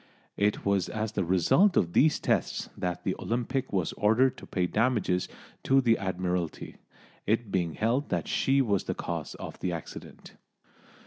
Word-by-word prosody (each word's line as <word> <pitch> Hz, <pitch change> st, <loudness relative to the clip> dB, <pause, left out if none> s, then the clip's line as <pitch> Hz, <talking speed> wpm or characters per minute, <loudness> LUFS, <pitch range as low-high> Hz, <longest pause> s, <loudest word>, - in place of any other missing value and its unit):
It 105 Hz, +1 st, 0 dB
was 100 Hz, -2 st, +1 dB
as 110 Hz, 0 st, -3 dB
the 110 Hz, -, -1 dB
result 95 Hz, -, +3 dB
of 85 Hz, 0 st, +1 dB
these 150 Hz, +1 st, +4 dB
tests -, -, -1 dB
that 90 Hz, -1 st, -3 dB
the 95 Hz, -, 0 dB
Olympic 125 Hz, +3 st, -2 dB
was 95 Hz, -5 st, -1 dB
ordered 115 Hz, +5 st, +3 dB
to -, -, -11 dB
pay 90 Hz, -2 st, 0 dB
damages 105 Hz, -3 st, 0 dB, 0.4 s
to 135 Hz, +1 st, +5 dB
the 120 Hz, -3 st, +4 dB
Admiralty, 90 Hz, -3 st, -3 dB, 0.5 s
it 110 Hz, 0 st, 0 dB
being 85 Hz, -4 st, -1 dB
held 120 Hz, +7 st, 0 dB
that -, -, -1 dB
she 135 Hz, 0 st, +2 dB
was 100 Hz, -5 st, 0 dB
the -, -, -2 dB
cause -, -, -4 dB
of -, -, -8 dB
the 90 Hz, -, -2 dB
accident. 85 Hz, -2 st, -9 dB
100 Hz, 165 wpm, -28 LUFS, 90-120 Hz, 0.5 s, to